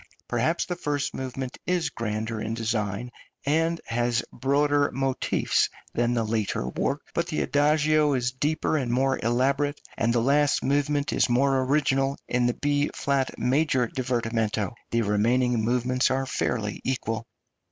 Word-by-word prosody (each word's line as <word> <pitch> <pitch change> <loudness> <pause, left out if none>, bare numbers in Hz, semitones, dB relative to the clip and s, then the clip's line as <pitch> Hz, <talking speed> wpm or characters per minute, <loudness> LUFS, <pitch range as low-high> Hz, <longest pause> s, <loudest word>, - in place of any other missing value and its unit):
Perhaps 125 +8 0
the 180 - -3
first 145 -4 -2
movement 130 0 -5
is 175 -5 0
grander 110 -1 -3
in 110 +1 -3
design, 115 0 -2 0.3
and 165 +3 +1
has 120 0 0
broader 145 +2 +2
motifs 135 0 +1 0.2
than 120 +1 +1
the 115 - +1
later 110 - -1
work; 140 - -1
but 170 0 0
the 160 - -1
adagio 150 0 +3
is 125 -2 0
deeper 155 +4 0
and 125 -5 -1
more 130 +2 +1
elaborate, 135 +5 +1 0.2
and 115 +1 +1
the 120 - +2
last 140 +4 +2
movement 145 +1 +1
is - - +2
more 135 +2 +3
original 135 -1 +1
in 125 0 +1
the 120 - 0
B 145 0 +1
flat 140 -2 0
major 130 -2 +2
divertimento. 115 -5 -1 0.2
The 115 0 +1
remaining 115 +3 +2
movements 125 +2 +1
are 135 +1 0
fairly 110 -5 -2
equal. 115 -3 -2
130 Hz, 145 wpm, -26 LUFS, 115-145 Hz, 0.3 s, adagio